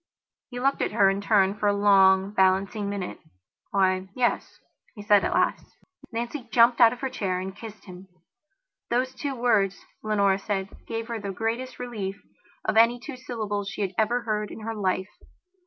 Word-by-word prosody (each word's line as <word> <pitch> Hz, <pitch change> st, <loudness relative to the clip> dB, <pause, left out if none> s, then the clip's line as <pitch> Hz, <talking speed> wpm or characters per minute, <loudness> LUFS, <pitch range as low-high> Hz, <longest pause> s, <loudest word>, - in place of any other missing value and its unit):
He 245 Hz, -1 st, -6 dB
looked 275 Hz, +2 st, +1 dB
at -, -, -1 dB
her 195 Hz, -1 st, +4 dB
in 195 Hz, +1 st, -3 dB
turn 200 Hz, -2 st, +3 dB
for 210 Hz, 0 st, -1 dB
a 205 Hz, -, +3 dB
long, 195 Hz, -1 st, +5 dB
balancing 195 Hz, +1 st, +1 dB
minute. 200 Hz, -3 st, -5 dB, 0.5 s
"Why, 190 Hz, -1 st, +1 dB
yes," 245 Hz, -2 st, -1 dB, 0.4 s
he 205 Hz, -, -9 dB
said 205 Hz, -1 st, +4 dB
at -, -, 0 dB
last. -, -, +1 dB, 0.5 s
Nancy 240 Hz, +3 st, -4 dB
jumped 235 Hz, +1 st, +5 dB
out 230 Hz, -1 st, +8 dB
of 250 Hz, -, -8 dB
her 265 Hz, -, -1 dB
chair 185 Hz, -3 st, -2 dB
and 190 Hz, +1 st, -6 dB
kissed 215 Hz, -1 st, -11 dB
him. 185 Hz, 0 st, -11 dB, 0.8 s
Those 255 Hz, +2 st, 0 dB
two 275 Hz, +1 st, -4 dB
words, 215 Hz, -6 st, +1 dB, 0.2 s
Leonora 200 Hz, -2 st, +2 dB
said, 195 Hz, -1 st, -3 dB, 0.2 s
gave 225 Hz, 0 st, -4 dB
her 230 Hz, -1 st, -3 dB
the 200 Hz, -1 st, -5 dB
greatest 225 Hz, +6 st, -3 dB
relief 210 Hz, -6 st, -5 dB, 0.5 s
of -, -, 0 dB
any 230 Hz, +2 st, +5 dB
two 275 Hz, +2 st, -8 dB
syllables 215 Hz, -5 st, -4 dB
she 205 Hz, -, -3 dB
had 190 Hz, -1 st, -3 dB
ever 230 Hz, +4 st, +1 dB
heard 210 Hz, -2 st, -2 dB
in -, -, -9 dB
her 225 Hz, +1 st, -4 dB
life. 190 Hz, -2 st, -1 dB
210 Hz, 180 wpm, -26 LUFS, 195-235 Hz, 0.8 s, out